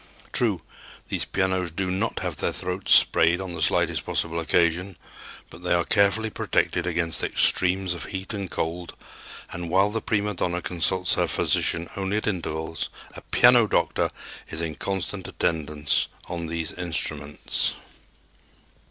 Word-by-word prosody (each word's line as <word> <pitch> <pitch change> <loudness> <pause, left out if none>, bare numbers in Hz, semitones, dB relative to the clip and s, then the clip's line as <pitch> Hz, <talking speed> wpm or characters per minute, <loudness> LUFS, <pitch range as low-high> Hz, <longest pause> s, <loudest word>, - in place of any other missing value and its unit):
True, - - +2 0.5
these - - -1
pianos 95 -2 0
do 90 +3 -2
not 100 +5 -1
have - - -3
their - - 0
throats 90 +2 -3
sprayed 85 +2 +6
on 95 -2 -5
the 85 - -5
slightest - - +2
possible 85 0 -1
occasion, 85 +3 +1 0.5
but - - -11
they 90 - +2
are 85 - +2
carefully 105 +2 +2
protected - - 0
against 85 -1 +1
extremes 95 0 +2
of 85 0 -6
heat 95 +2 -5
and 100 -3 -4
cold, 85 +2 -4 0.6
and, 85 -1 -5
while 95 +4 +3
the 110 +1 -2
prima 105 -1 0
donna 90 -1 -1
consults 90 +1 0
her - - +1
physician 85 +1 +1
only 95 +1 -1
at 110 - -2
intervals, 80 -5 -3 0.2
a - - -9
"piano 120 -2 +5
doctor" - - +1 0.4
is 80 - -2
in 80 -1 -2
constant 95 +2 -4
attendance 75 -3 0 0.2
on 85 -1 -4
these 80 -1 -2
instruments. 80 -4 -2
90 Hz, 145 wpm, -25 LUFS, 85-95 Hz, 0.6 s, sprayed